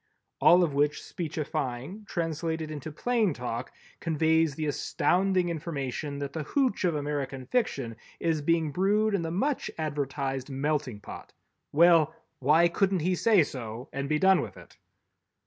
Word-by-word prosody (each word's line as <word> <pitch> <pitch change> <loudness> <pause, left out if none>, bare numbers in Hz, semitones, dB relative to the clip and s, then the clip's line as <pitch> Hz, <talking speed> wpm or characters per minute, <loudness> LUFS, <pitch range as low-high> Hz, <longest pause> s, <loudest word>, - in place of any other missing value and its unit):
All 175 +1 +7
of 155 -5 0
which 145 +1 +2
speechifying 155 - -4
translated 160 -2 -2
into 155 +1 -6
plain 220 - +1
talk 125 0 -4 0.3
conveys 160 -1 +2
the 155 0 -2
astounding 180 +5 +1
information 150 -3 -4
that 140 -1 -5
the 160 - -3
hooch 250 - 0
of 170 -3 +1
American 140 -3 -3
Fiction 135 - -1 0.2
is 160 -2 0
being 160 0 +1
brewed 205 +6 +2
in 200 - +1
the 165 - -3
much 265 - -1
advertised 140 -3 -2
Melting 140 -5 -2
Pot! - - -10 0.4
Well, 165 0 +5 0.2
why 155 +6 +5
couldn't 190 +1 +1
he 180 +4 +1
say 200 0 +4
so 120 -3 -7
and 140 0 -3
be 155 - +2
done 190 +3 +5
with - - -7
it? - - -15
155 Hz, 145 wpm, -28 LUFS, 140-175 Hz, 0.4 s, All